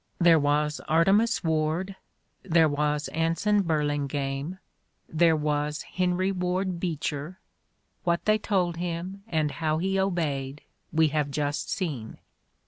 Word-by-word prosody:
There 170 Hz, -2 st, +6 dB
was 150 Hz, +1 st, +1 dB
Artemus 195 Hz, +9 st, +3 dB
Ward, 160 Hz, +4 st, 0 dB, 0.5 s
there 165 Hz, -3 st, +4 dB
was 150 Hz, 0 st, 0 dB
Anson 165 Hz, +6 st, +1 dB
Burling 145 Hz, -4 st, 0 dB
ame, 140 Hz, +5 st, -3 dB, 0.6 s
thercN 160 Hz, -1 st, +4 dB
was 150 Hz, 0 st, -1 dB
Henry 185 Hz, +1 st, 0 dB
Ward 180 Hz, -1 st, -1 dB
Beecher: 160 Hz, 0 st, -3 dB, 0.6 s
what 170 Hz, -1 st, 0 dB
they 215 Hz, 0 st, +3 dB
told 180 Hz, -5 st, 0 dB
him, 175 Hz, +3 st, -4 dB
and 155 Hz, -6 st, 0 dB
how 155 Hz, 0 st, -1 dB
he 190 Hz, +3 st, 0 dB
obeyed, 150 Hz, -7 st, -1 dB, 0.3 s
we 160 Hz, 0 st, +3 dB
have 150 Hz, -1 st, 0 dB
just 145 Hz, +1 st, -2 dB
seen. 145 Hz, -, -3 dB
160 Hz, 125 wpm, -27 LUFS, 150-180 Hz, 0.6 s, There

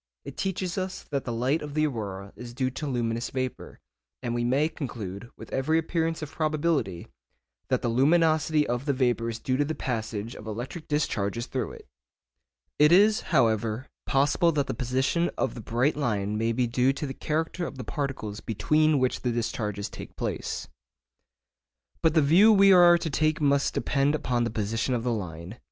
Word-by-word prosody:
It -, -, -8 dB
teaches 190 Hz, -1 st, -2 dB
us 185 Hz, 0 st, -4 dB
that 140 Hz, -2 st, -2 dB
the 120 Hz, -, -3 dB
light 125 Hz, +7 st, 0 dB
of 150 Hz, -1 st, -7 dB
the 155 Hz, 0 st, +3 dB
aurora 100 Hz, -7 st, -5 dB
is 120 Hz, -1 st, -9 dB
due 130 Hz, 0 st, 0 dB
to 150 Hz, +3 st, -5 dB
luminous 120 Hz, -2 st, -1 dB
vapour, 130 Hz, -1 st, -5 dB, 0.4 s
and 120 Hz, -1 st, -2 dB
we 120 Hz, 0 st, -1 dB
may 135 Hz, +5 st, +2 dB
conclude, 115 Hz, -, -6 dB
with -, -, -11 dB
every 155 Hz, +5 st, +1 dB
appearance 165 Hz, 0 st, -1 dB
of 150 Hz, -, -7 dB
probability, 155 Hz, -, -1 dB, 0.6 s
that -, -, 0 dB
the -, -, +1 dB
luminosity 155 Hz, +4 st, +3 dB
of 120 Hz, +2 st, -2 dB
the 140 Hz, -, +1 dB
vapour 120 Hz, -3 st, +1 dB
is 115 Hz, -, -4 dB
due 130 Hz, +2 st, -1 dB
to 145 Hz, -, +3 dB
the 155 Hz, +2 st, -3 dB
passage 110 Hz, -3 st, -3 dB
of 105 Hz, -, -10 dB
electric 125 Hz, +9 st, -6 dB
discharges 115 Hz, -7 st, -1 dB
through 130 Hz, -1 st, -3 dB
it. -, -, -13 dB, 0.9 s
It 150 Hz, +1 st, +6 dB
is, 210 Hz, +4 st, +5 dB
however, 110 Hz, +2 st, +1 dB, 0.2 s
possible 145 Hz, +5 st, +3 dB
that 145 Hz, -2 st, +1 dB
the -, -, -3 dB
position 135 Hz, +7 st, 0 dB
of -, -, 0 dB
the 120 Hz, -, -8 dB
bright 120 Hz, +7 st, +1 dB
line 105 Hz, -8 st, -1 dB
may 115 Hz, +2 st, 0 dB
be 125 Hz, +2 st, +1 dB
due 125 Hz, +3 st, +2 dB
to 145 Hz, -, -4 dB
the 135 Hz, -, -4 dB
character 160 Hz, +5 st, -2 dB
of 140 Hz, -, -9 dB
the 130 Hz, -, -5 dB
particles 110 Hz, -5 st, -4 dB
between 150 Hz, +9 st, +2 dB
which 130 Hz, -1 st, 0 dB
the 125 Hz, -, 0 dB
discharges 105 Hz, -3 st, -2 dB
take -, -, -10 dB
place. -, -, -4 dB, 1.3 s
But 160 Hz, 0 st, +2 dB
the 155 Hz, -, +5 dB
view 180 Hz, +10 st, +6 dB
we 195 Hz, -2 st, +7 dB
are 175 Hz, -1 st, +7 dB
to 165 Hz, -, -3 dB
take 155 Hz, +2 st, +1 dB
must 140 Hz, -2 st, +2 dB
depend 140 Hz, +2 st, +1 dB
upon 120 Hz, -5 st, 0 dB
the -, -, -1 dB
position 115 Hz, +3 st, -1 dB
of 115 Hz, -, -2 dB
the 120 Hz, -1 st, 0 dB
line. 90 Hz, 0 st, -6 dB
130 Hz, 185 wpm, -27 LUFS, 115-155 Hz, 1.3 s, we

